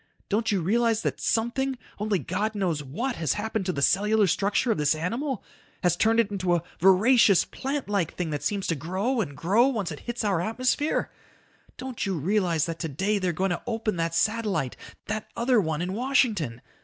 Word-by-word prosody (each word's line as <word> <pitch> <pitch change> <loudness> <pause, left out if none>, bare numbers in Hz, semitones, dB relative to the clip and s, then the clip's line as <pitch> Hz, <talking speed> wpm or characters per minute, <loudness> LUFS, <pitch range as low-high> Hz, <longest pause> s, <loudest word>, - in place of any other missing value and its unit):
Don't 220 +2 +1
you 195 -3 +1
realize 230 +4 +2
that - - -2
something, 260 +4 0 0.2
only 210 -1 +1
God 205 +5 -2
knows 175 -7 0
what, 235 - -3
has 160 -5 0
happened 215 -2 -3
to - - +2
the 140 -5 -2
cellular 210 +4 +3
structure 200 +6 +1
of 215 - 0
this 150 +1 +3
animal, 235 - -3 0.4
has 175 -1 +3
turned 225 +5 +3
it 220 -3 +2
into 185 -3 +1
a 170 - -1 0.2
voracious 200 +2 +5
plant 275 +1 -4
like 200 -5 -1
thing 170 -3 -3
that 145 -2 -3
seems 195 +6 -1
to 165 - 0
grow 190 - -1
and 145 -8 -5
grow 200 - +3
once 215 -10 -2
it 150 - -7
hits 240 -1 -4
our 195 -5 +1
atmosphere? 255 - 0 0.7
Don't 255 -2 -5
you 190 -3 -1
realize 175 -1 +1
that 165 -1 -5
today 190 +7 -1
they're 185 -2 0
going 185 +3 -1
to 175 - -2
open 225 -4 -1
that 165 0 -1
satellite, 205 - 0 0.3
that 215 +1 -4
other 235 -1 +3
one, 160 -2 -2
in 185 +1 -3
Washington? 215 - 0
200 Hz, 190 wpm, -26 LUFS, 170-225 Hz, 0.7 s, voracious